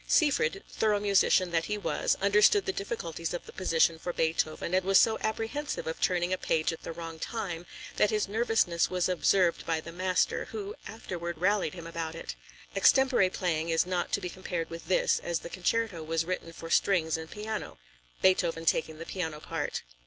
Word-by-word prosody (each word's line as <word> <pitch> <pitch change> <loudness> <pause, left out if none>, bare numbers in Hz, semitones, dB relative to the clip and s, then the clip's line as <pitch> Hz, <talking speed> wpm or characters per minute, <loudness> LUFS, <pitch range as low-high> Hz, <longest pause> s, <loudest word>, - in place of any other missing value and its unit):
Seyfried, 260 - +2
thorough 210 -2 +1
musician 195 -3 +3
that 165 -1 +1
he 210 - -2
was, 205 - 0
understood 210 - +5
the 385 - -1
difficulties 170 - -4
of 175 - -6
the - - -12
position 165 -3 +2
for 175 - -3
Beethoven, 160 0 -1
and 185 0 +3
was 195 +1 +5
so 220 -1 +3
apprehensive 225 +7 -3
of 160 - -4
turning 180 0 +1
a 185 - -1
page 160 0 0
at 165 - -9
the - - -6
wrong 165 -1 -7
time, 175 -7 -4 0.3
that 210 - +4
his 215 -1 0
nervousness 215 -5 +1
was 180 -1 0
observed 180 0 +2
by 165 -1 0
the 165 +1 -9
master, 185 +1 0
who 415 -1 -6
afterward 170 -6 -5
rallied 185 -1 +1
him 170 -2 -8
about 165 -1 -4
it. 165 - -6 0.4
Extempore 250 -1 +4
playing 170 -3 -1
is 165 +1 +2
not 180 -1 -2
to - - +1
be - - -3
compared 175 -2 -4
with 165 0 -8
this, 185 - +2
as 170 -1 -2
the - - -7
concerto 195 -1 -1
was 165 +1 -1
written 180 -1 -4
for 165 0 -9
strings 165 -5 +3
and 160 0 -6
piano, 215 - -5 0.5
Beethoven 170 -3 +2
taking 160 -1 +1
the 165 - -7
piano 160 -5 -4
part. 155 -1 -4
180 Hz, 190 wpm, -29 LUFS, 165-200 Hz, 0.5 s, understood